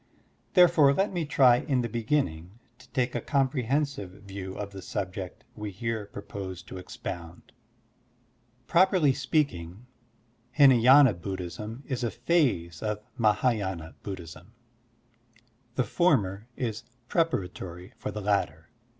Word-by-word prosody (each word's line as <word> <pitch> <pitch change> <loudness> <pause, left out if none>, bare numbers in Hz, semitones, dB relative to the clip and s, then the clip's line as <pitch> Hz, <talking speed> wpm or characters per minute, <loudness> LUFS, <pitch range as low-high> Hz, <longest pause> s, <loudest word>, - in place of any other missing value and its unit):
Therefore, 170 -6 +6
let 195 +3 +1
me 170 -3 -1
try 130 -4 +5
in 130 -1 0
the 120 - -1
beginning 110 - -1 0.2
to 130 - -18
take 125 -1 0
a 120 - -2
comprehensive 135 -3 0
view 95 -1 -7
of 100 -1 -5
the 95 -1 -8
subject 95 -1 -5
we 105 -1 -5
here 110 +1 -3
propose 100 -3 -7
to 95 - -9
expound. 85 -1 -8 1.1
Properly 180 -4 +4
speaking, 105 - -1 0.7
Htnay^na 130 - +7
Buddhism 100 - -6
is 130 -2 -3
a 120 - +1
phase 115 - 0
of 105 -1 -3
Mah^yina 105 - 0
Buddhism. 90 0 -8 1.2
The 130 - +2
former 105 - +1
is 115 -2 -2 0.3
preparatory 95 - -2
for - - -4
the 105 +1 -5
latter. 80 -6 -1
110 Hz, 115 wpm, -28 LUFS, 95-135 Hz, 1.2 s, Htnay^na